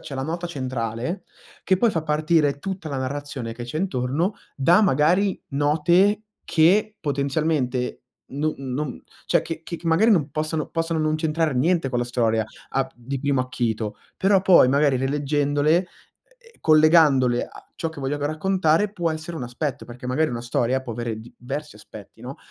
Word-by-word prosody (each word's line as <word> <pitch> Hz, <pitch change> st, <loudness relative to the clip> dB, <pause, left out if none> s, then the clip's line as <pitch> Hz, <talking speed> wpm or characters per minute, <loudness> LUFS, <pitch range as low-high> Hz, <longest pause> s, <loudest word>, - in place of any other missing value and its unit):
c'è 140 Hz, -, -8 dB
la 130 Hz, -, -3 dB
nota 170 Hz, +5 st, -3 dB
centrale, 130 Hz, -, -4 dB, 0.4 s
che 190 Hz, -, +2 dB
poi 225 Hz, +4 st, +3 dB
fa 165 Hz, -, -1 dB
partire 150 Hz, -1 st, +1 dB
tutta 185 Hz, 0 st, -5 dB
la 140 Hz, -2 st, -3 dB
narrazione 130 Hz, -3 st, -4 dB
che 120 Hz, +1 st, -8 dB
c'è 120 Hz, +6 st, -4 dB
intorno 160 Hz, +2 st, -1 dB, 0.2 s
da, 170 Hz, +8 st, +5 dB
magari, 185 Hz, +3 st, +2 dB
note 170 Hz, +9 st, +2 dB, 0.2 s
che 200 Hz, +6 st, +3 dB
potenzialmente 140 Hz, -3 st, -1 dB, 0.3 s
no 150 Hz, +3 st, -1 dB
non 135 Hz, +1 st, -4 dB, 0.3 s
cioè -, -, +3 dB
che 165 Hz, -1 st, -6 dB
che 170 Hz, 0 st, -6 dB
magari 165 Hz, +8 st, +4 dB
non 160 Hz, -8 st, +3 dB
possono 155 Hz, +1 st, -2 dB
possono 165 Hz, 0 st, -1 dB
non 155 Hz, 0 st, +1 dB
c'entrare 155 Hz, -1 st, 0 dB
niente 160 Hz, +3 st, +2 dB
con 125 Hz, -2 st, -1 dB
la -, -, 0 dB
storia 115 Hz, -2 st, +1 dB, 0.3 s
al 135 Hz, 0 st, 0 dB
di 125 Hz, +3 st, -5 dB
primo 140 Hz, -2 st, +1 dB
acchito, 115 Hz, -4 st, -2 dB, 0.2 s
però 195 Hz, 0 st, +3 dB
poi 180 Hz, -9 st, +6 dB
magari 140 Hz, 0 st, +3 dB
rileggendole, 145 Hz, +4 st, +1 dB, 0.5 s
e 465 Hz, -1 st, -22 dB
collegandole 155 Hz, -6 st, +5 dB
a -, -, -15 dB
ciò 165 Hz, -, -2 dB
che 160 Hz, -, -11 dB
voglio 135 Hz, +2 st, -1 dB
raccontare, 160 Hz, +5 st, +1 dB
può 175 Hz, -5 st, -1 dB
essere 160 Hz, +1 st, -5 dB
un 135 Hz, -, -5 dB
aspetto, 135 Hz, +3 st, -4 dB
perché 120 Hz, +1 st, -10 dB
magari 155 Hz, +5 st, +1 dB
una 120 Hz, -1 st, -4 dB
storia 120 Hz, +2 st, 0 dB
può 125 Hz, -3 st, -6 dB
avere 115 Hz, -1 st, -4 dB
diversi 135 Hz, +6 st, -7 dB
aspetti, 105 Hz, +1 st, -13 dB
no, 130 Hz, +3 st, -8 dB
150 Hz, 165 wpm, -23 LUFS, 130-165 Hz, 0.5 s, poi